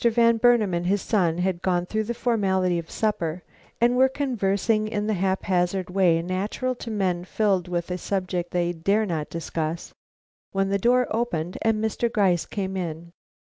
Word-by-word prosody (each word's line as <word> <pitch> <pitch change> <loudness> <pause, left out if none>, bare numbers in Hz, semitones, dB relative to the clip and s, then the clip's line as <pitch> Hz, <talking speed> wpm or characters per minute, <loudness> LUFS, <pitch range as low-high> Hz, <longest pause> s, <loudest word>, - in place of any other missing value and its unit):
Van 235 0 +4
Burnam 225 -5 +4
and 170 +1 -1
his 200 +2 +2
sons 175 -5 +1
had 180 -1 -1
gone 180 -2 +1
through 215 +3 -2
the 235 +2 -3
formality 190 -7 +1
of 165 - -8
a - - -15
supper 180 -6 -1 0.4
and 240 +1 +3
were 260 +1 +5
conversing 215 -5 0
in 210 -1 -2
the 215 - 0
haphazard 185 -1 0
way 175 -3 +3
natural 200 +8 -2
to 245 - -8
men 185 -5 -1
filled 190 -2 0
with 175 0 -3
a 180 - -2
subject 180 -2 -2
they 175 0 0
dare 200 +6 +1
not 160 -6 -3
discuss, 165 0 -4 0.6
when 195 0 +1
the 200 0 +1
door 250 +4 +3
opened 185 -7 -2
and 225 -1 +2
Mr. 225 +2 0
Gryce 190 -6 +2
came 190 -2 -3
in. 170 -2 -5
190 Hz, 180 wpm, -25 LUFS, 175-220 Hz, 0.6 s, were